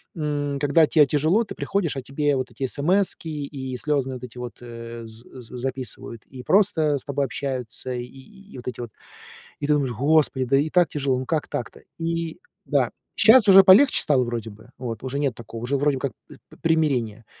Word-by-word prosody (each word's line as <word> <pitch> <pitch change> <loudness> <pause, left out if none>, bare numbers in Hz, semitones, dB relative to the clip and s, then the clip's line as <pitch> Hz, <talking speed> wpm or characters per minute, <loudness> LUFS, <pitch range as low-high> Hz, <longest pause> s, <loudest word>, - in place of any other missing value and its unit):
м, 145 -2 -2
когда 145 +2 +4
те 150 -3 +5
тяжело, 155 - +2
ты - - -9
приходишь, 175 -8 -2
а - - -3
тебе 140 +2 0
вот 130 -1 -4
эти 125 +3 -7
эсэмэски 170 +6 0
и 140 -4 -5
слёзные 135 -2 -1
вот 125 - -10
эти 125 0 -10
вот, 125 0 -8
э, 115 -1 -8
з 110 +1 -12 0.2
з 120 +2 -10
записывают, 130 -2 -6
и 130 -2 -11
просто 160 -7 +3
с - - -8
тобой 140 -1 -1
общаются, 130 -1 -4
и 120 - -3
и 195 - -16
и - - -9
вот 125 - -10
эти 125 - -9
вот. 115 -3 -7 0.7
И 145 - -3
ты 150 - +4
думаешь: 140 -4 0
"Господи, 140 +1 +2
да 135 - +2
и 150 +3 +1
так 175 -1 +4
тяжело, 135 -3 -1
ну 130 - -5
как 160 -3 -1
так-то?" 120 - -5 0.2
И 165 - -3 0.3
да, - - +1 0.2
щас 225 -1 +6
уже 195 0 +9
полегче 200 +9 +6
стало, 135 -4 +2
вроде 115 -2 -4
бы. 110 +4 -15
Вот 115 -2 -5
уже 135 +2 -3
нет 140 -5 0
такого, 115 0 -9
уже 140 +3 0
вроде 140 -1 +1
как 140 - -3
п - - -15 0.2
примирение. 130 -10 0
140 Hz, 205 wpm, -23 LUFS, 125-155 Hz, 0.7 s, уже